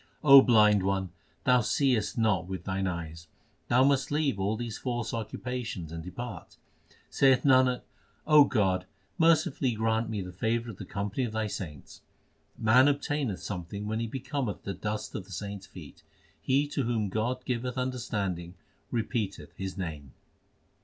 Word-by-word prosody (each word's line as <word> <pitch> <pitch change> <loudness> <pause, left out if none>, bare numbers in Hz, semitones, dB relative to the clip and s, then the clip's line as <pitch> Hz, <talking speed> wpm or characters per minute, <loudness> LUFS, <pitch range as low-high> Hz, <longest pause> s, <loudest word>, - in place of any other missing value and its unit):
O 140 -2 +10
blind 105 -5 +5
one, 95 -1 -1 0.3
thou 125 -1 +4
seest 120 -3 +1
not 105 -6 +1
with 95 -1 -5
thine 95 0 -2
eyes: 80 -2 -5 0.4
Thou 125 +2 +4
must 135 0 +2
leave 145 -7 0
all 100 +3 0
these 120 -2 -5
false 120 -3 -3
occupations 115 -5 -4
and 80 0 -6
depart. 120 +7 -8 0.5
Saith 130 -2 +4
Nanak, 130 -2 +4 0.7
God, 95 -5 +1 0.3
mercifully 155 -6 +3
grant 110 +1 0
me 110 -2 -3
The 90 - -8
favour 115 +5 -1
of 100 - -13
the 100 - -7
company 100 +7 -3
of 115 -3 -3
Thy 110 0 -1
saints. 80 -8 -7 0.6
Man 120 +5 +5
obtaineth 145 -6 -1
something 100 +1 -5
when 110 +1 -2
he 115 - -2
becometh 130 -1 -4
the 100 - -3
dust 105 +3 -4
of 100 - -5
the 100 - -16
saints 100 +1 -6
feet 90 -6 -12 0.4
He 140 +2 +2
to 140 - -1
whom 115 -4 -1
God 120 +5 -2
giveth 125 +1 -2
understanding 100 -9 -3 0.4
repeateth 110 - -3
His 95 0 -5
name. 75 -8 -6
110 Hz, 155 wpm, -29 LUFS, 95-125 Hz, 0.7 s, O